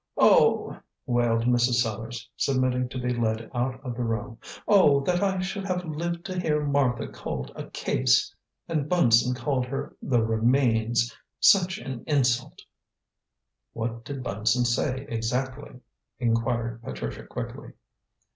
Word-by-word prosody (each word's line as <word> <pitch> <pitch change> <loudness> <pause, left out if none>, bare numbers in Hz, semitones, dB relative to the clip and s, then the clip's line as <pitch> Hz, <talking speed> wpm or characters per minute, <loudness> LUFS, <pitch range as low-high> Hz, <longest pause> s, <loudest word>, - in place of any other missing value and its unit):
"Oh!" - - +4 0.3
wailed 120 -1 +1
Mrs. 120 0 +3
Sellars, 115 0 -2
submitting 130 -2 0
to 130 - -6
be 125 0 -1
led 110 -1 -2
out 130 +1 -1
of 125 -2 -4
the 125 - -4
room. 115 0 -3 0.3
"Oh, 150 -9 +5
that 175 +5 0
I 195 -1 +1
should 195 +2 -3
have 180 -2 -2
lived 170 +2 -4
to 185 -1 -3
hear 150 -4 0
Martha 140 -4 +1
called 65 0 -6
a - - -7
case! - - +1 0.3
And 155 -3 -1
Bunson 125 -8 +4
called 130 0 -1
her 135 +2 -5
'the 120 -4 +1
remains.' 115 0 +2 0.2
Such 190 -1 +5
an 130 -3 -7
insult!" 125 -5 0 1.1
"What 115 0 -4
did 135 0 -6
Bunson 115 +4 +1
say 130 +3 0
exactly?" 125 +3 -3 0.4
inquired 115 -1 0
Patricia 65 - -6
quickly. - - -7
125 Hz, 135 wpm, -26 LUFS, 115-140 Hz, 1.1 s, Oh